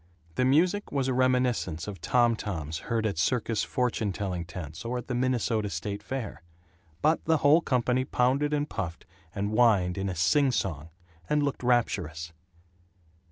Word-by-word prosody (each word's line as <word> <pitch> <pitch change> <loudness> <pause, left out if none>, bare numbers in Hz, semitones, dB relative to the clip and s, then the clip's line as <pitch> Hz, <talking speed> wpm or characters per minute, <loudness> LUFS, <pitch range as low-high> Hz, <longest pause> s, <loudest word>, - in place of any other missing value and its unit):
The 125 - +1
music 175 +10 +2
was 135 -2 0
a 130 - +1
reminiscence 125 -10 +1
of 95 -5 -7
tom 120 -2 +3
toms 80 -8 -4
heard 115 -2 0
at 100 -7 -1
circus 115 +1 +1
fortune 120 -5 -1
telling 90 -3 -3
tents 80 0 -8
or 120 +2 -2
at 120 - -5
the 125 - -3
Minnesota 120 -4 0
State 100 +4 -4
Fair, 130 -5 -5 0.6
but 155 +2 +3
the 160 0 +3
whole 155 +4 +6
company 125 -3 +1
pounded 130 +3 +1
and 145 0 0
puffed 85 - -5 0.3
and 100 +1 -1
whined 100 -6 +3
in 95 0 -1
a 90 - -3
sing 130 - +3
song, 80 - -2 0.4
and 150 -1 +2
looked 140 -1 -2
rapturous. 85 -10 0
115 Hz, 160 wpm, -28 LUFS, 95-130 Hz, 0.6 s, whole